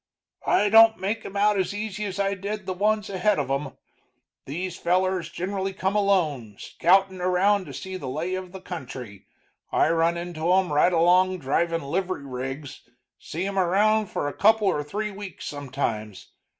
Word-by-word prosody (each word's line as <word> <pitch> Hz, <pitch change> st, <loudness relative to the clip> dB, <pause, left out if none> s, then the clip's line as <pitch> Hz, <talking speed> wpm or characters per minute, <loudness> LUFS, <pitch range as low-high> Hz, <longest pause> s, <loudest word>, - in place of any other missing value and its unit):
"I 205 Hz, -, +3 dB
don't 225 Hz, +1 st, +7 dB
make 210 Hz, +3 st, -2 dB
'em 200 Hz, -, -6 dB
out 205 Hz, 0 st, +3 dB
as 190 Hz, +2 st, -1 dB
easy 210 Hz, 0 st, -4 dB
as 195 Hz, -1 st, -5 dB
I 200 Hz, 0 st, +1 dB
did 200 Hz, +1 st, -5 dB
the 185 Hz, -, -2 dB
ones 210 Hz, +2 st, +1 dB
ahead 200 Hz, +2 st, +1 dB
of -, -, -2 dB
'em. 135 Hz, 0 st, -3 dB, 0.7 s
These 175 Hz, +5 st, -4 dB
fellers 185 Hz, 0 st, 0 dB
generally 195 Hz, +1 st, -3 dB
come 190 Hz, +1 st, -1 dB
alone, 160 Hz, -, +1 dB
scoutin' 190 Hz, +1 st, +2 dB
around 185 Hz, +2 st, +2 dB
to 140 Hz, -, -8 dB
see 185 Hz, +8 st, -6 dB
the 140 Hz, -8 st, -6 dB
lay 160 Hz, +7 st, -3 dB
of 185 Hz, -1 st, -5 dB
the 190 Hz, 0 st, -9 dB
country 130 Hz, -, -8 dB, 0.4 s
I 160 Hz, -, +3 dB
run 165 Hz, +1 st, +2 dB
into 170 Hz, -1 st, -2 dB
'em 185 Hz, -4 st, +2 dB
right 150 Hz, +5 st, +4 dB
along 180 Hz, +2 st, +4 dB
drivin' 165 Hz, +3 st, 0 dB
livery 175 Hz, +1 st, -2 dB
rigs, 135 Hz, +2 st, -6 dB, 0.4 s
see 170 Hz, +4 st, -4 dB
'em 195 Hz, 0 st, -1 dB
around 210 Hz, +4 st, +3 dB
for 145 Hz, -, -3 dB
a 145 Hz, -, -3 dB
couple 220 Hz, 0 st, +4 dB
or 150 Hz, -6 st, +1 dB
three 210 Hz, +8 st, -3 dB
weeks 195 Hz, -3 st, -8 dB
sometimes. 130 Hz, -7 st, -4 dB
185 Hz, 175 wpm, -25 LUFS, 155-200 Hz, 0.7 s, don't